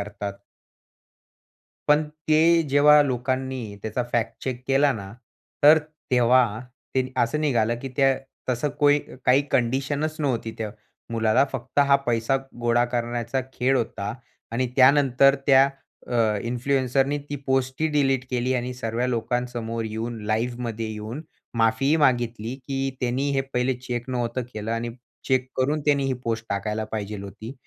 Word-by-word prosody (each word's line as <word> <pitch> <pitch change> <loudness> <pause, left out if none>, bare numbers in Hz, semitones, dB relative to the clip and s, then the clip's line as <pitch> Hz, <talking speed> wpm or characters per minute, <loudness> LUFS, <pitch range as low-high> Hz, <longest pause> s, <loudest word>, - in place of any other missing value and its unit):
करतात. 100 0 -5 1.6
पण 150 +1 +5 0.3
ते 165 +2 +5
जेव्हा 150 +1 +7
लोकांनी 130 -3 -2
त्याचा 110 +3 -2
फॅक्ट 115 -1 0
चेक 125 -1 -4
केला 140 +1 +4
ना, 100 -3 -7 0.5
तर 150 +2 +9 0.3
तेव्हा 120 -3 +4 0.4
ते 130 0 0
असं 135 +6 +1
निघालं 120 -6 +1
की 135 - -5
त्या 135 -1 +4 0.3
तसं 125 +4 0
कोई 145 0 +5 0.3
काही 130 +3 +5
कंडिशनच 140 +5 0
नव्हती 120 -6 -1
त्या 110 -2 -3 0.4
मुलाला, 110 +2 +3
फक्त 130 +2 -3
हा 140 - +6
पैसा 120 +2 +1 0.3
गोळा 120 0 +3
करण्याचा 120 +1 -1
खेळ 130 +2 +1
होता 110 -4 -3 0.4
आणि 125 +2 0
त्यानंतर 135 0 +5
त्या 135 0 +6 0.4
अ, 110 -3 +1
इन्फ्लुएन्सरनी 135 +3 0
ती 145 - -2
पोस्टही 130 +3 +1
डिलीट 135 -3 +2
केली 125 0 0
आणि 125 0 -2
सर्व्या 120 0 -2
लोकांसमोर 120 -1 -2
येऊन 110 +1 -4
लाईव्हमध्ये 115 +1 -2
येऊन 110 +7 -6 0.4
माफीही 115 +7 +3
मागितली, 120 -4 +1
की 135 0 -3
त्यांनी 130 +3 0
हे 135 -1 +1
पहिले 125 +1 +1
चेक 125 0 -5
नव्हतं 120 0 -1
केलं 110 +1 -4
आणि 115 +1 -2 0.4
चेक 130 -1 +2
करून 145 +4 +1
त्यांनी 140 -2 +3
ही 135 - 0
पोस्ट 115 0 -2
टाकायला 105 +2 -2
पाहिजे 105 -1 -4
होती 105 +5 -8
125 Hz, 140 wpm, -24 LUFS, 115-135 Hz, 1.6 s, तर